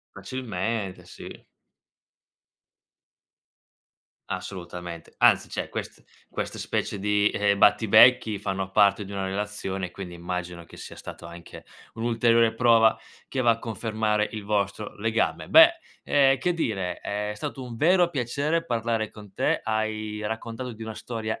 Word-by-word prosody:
Facilmente. 110 Hz, -5 st, -4 dB
Sì. -, -, -11 dB, 2.8 s
Assolutamente. 90 Hz, -2 st, -7 dB
Anzi -, -, +4 dB
cioè, -, -, -4 dB
quest -, -, -7 dB, 0.3 s
questa -, -, -4 dB
specie 100 Hz, -, -2 dB
di, 105 Hz, 0 st, +2 dB
uhm, 100 Hz, -1 st, +2 dB
battibecchi 110 Hz, 0 st, +5 dB
fanno 95 Hz, 0 st, -3 dB
parte 100 Hz, 0 st, +3 dB
di 100 Hz, -, -11 dB
una 100 Hz, -1 st, -3 dB
relazione, 95 Hz, -2 st, -3 dB
quindi 90 Hz, -1 st, -8 dB
immagino 85 Hz, 0 st, -5 dB
che -, -, -15 dB
sia -, -, -9 dB
stato -, -, -10 dB
anche 85 Hz, 0 st, -11 dB, 0.3 s
un'ulteriore 115 Hz, 0 st, +2 dB
prova 115 Hz, -2 st, +5 dB, 0.3 s
che 130 Hz, -, -3 dB
va 120 Hz, -2 st, +4 dB
a 115 Hz, -, +1 dB
confermare 110 Hz, -2 st, -1 dB
il 110 Hz, -2 st, -7 dB
vostro 100 Hz, 0 st, -2 dB
legame. 110 Hz, +1 st, -1 dB
Beh, 330 Hz, +1 st, +8 dB, 0.3 s
ehm, 135 Hz, -2 st, +4 dB
che 180 Hz, -2 st, 0 dB
dire, 95 Hz, -, -2 dB
è 105 Hz, +1 st, -3 dB
stato 120 Hz, +5 st, -6 dB
un 120 Hz, -2 st, -8 dB
vero 175 Hz, +5 st, +4 dB
piacere 145 Hz, +4 st, -1 dB
parlare 115 Hz, -4 st, -1 dB
con 105 Hz, -2 st, -13 dB
te. -, -, +1 dB
Hai 110 Hz, -1 st, -2 dB
raccontato 115 Hz, +3 st, -5 dB
di 110 Hz, +1 st, -10 dB
una 110 Hz, -1 st, -6 dB
storia 110 Hz, -2 st, -5 dB
110 Hz, 135 wpm, -26 LUFS, 100-115 Hz, 2.8 s, Beh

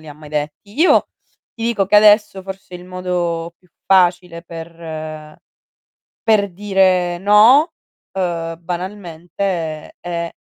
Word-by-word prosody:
li 155 Hz, -, -13 dB
ha -, -, -8 dB
mai 150 Hz, 0 st, -14 dB
detti. 155 Hz, -, -5 dB
Io 360 Hz, -, +5 dB, 0.5 s
ti 230 Hz, -, -8 dB
dico 230 Hz, -4 st, 0 dB
che, 205 Hz, -, 0 dB
adesso, 210 Hz, -2 st, +5 dB
forse 190 Hz, -1 st, -9 dB
il 180 Hz, -, -9 dB
modo 175 Hz, -2 st, -3 dB
più 180 Hz, -, -30 dB, 0.2 s
facile 175 Hz, -2 st, +2 dB
per 160 Hz, -2 st, -8 dB, 0.8 s
per 205 Hz, -3 st, +2 dB
dire 185 Hz, -2 st, +1 dB
no, 220 Hz, -, +6 dB, 0.4 s
uhm, 170 Hz, -3 st, -2 dB
banalmente 175 Hz, -2 st, -5 dB
è 170 Hz, -1 st, -4 dB
180 Hz, 120 wpm, -18 LUFS, 165-195 Hz, 0.8 s, no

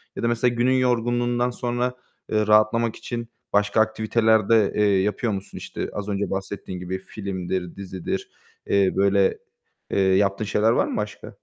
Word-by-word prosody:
Ya -, -, -5 dB
da -, -, +2 dB
mesela 120 Hz, +1 st, +2 dB
günün 120 Hz, +2 st, +2 dB
yorgunluğundan 120 Hz, -1 st, +1 dB
sonra, 120 Hz, 0 st, -2 dB, 0.4 s
ııı, 110 Hz, -1 st, +1 dB
rahatlamak 110 Hz, +2 st, +3 dB
için 120 Hz, -1 st, -5 dB, 0.3 s
başka 105 Hz, +1 st, +3 dB
aktiviteler 110 Hz, -1 st, +2 dB
de, 110 Hz, -3 st, +4 dB
eee, 100 Hz, -2 st, +3 dB
yapıyor 105 Hz, +2 st, -1 dB
musun? 95 Hz, 0 st, -6 dB
İşte, -, -, -5 dB
az 105 Hz, 0 st, -4 dB
önce 100 Hz, 0 st, -2 dB
bahsettiğin 95 Hz, -1 st, -5 dB
gibi 90 Hz, +1 st, -4 dB
filmdir, 95 Hz, -3 st, -4 dB
dizidir, 95 Hz, -2 st, -5 dB, 0.4 s
eee, 100 Hz, -2 st, +3 dB
böyle, 100 Hz, 0 st, +3 dB, 0.5 s
eee, -, -, +1 dB
yaptığın 95 Hz, +2 st, +2 dB
şeyler 105 Hz, +2 st, +2 dB
var -, -, +2 dB
mı -, -, -3 dB
başka? 105 Hz, 0 st, -5 dB
105 Hz, 160 wpm, -24 LUFS, 100-115 Hz, 0.5 s, de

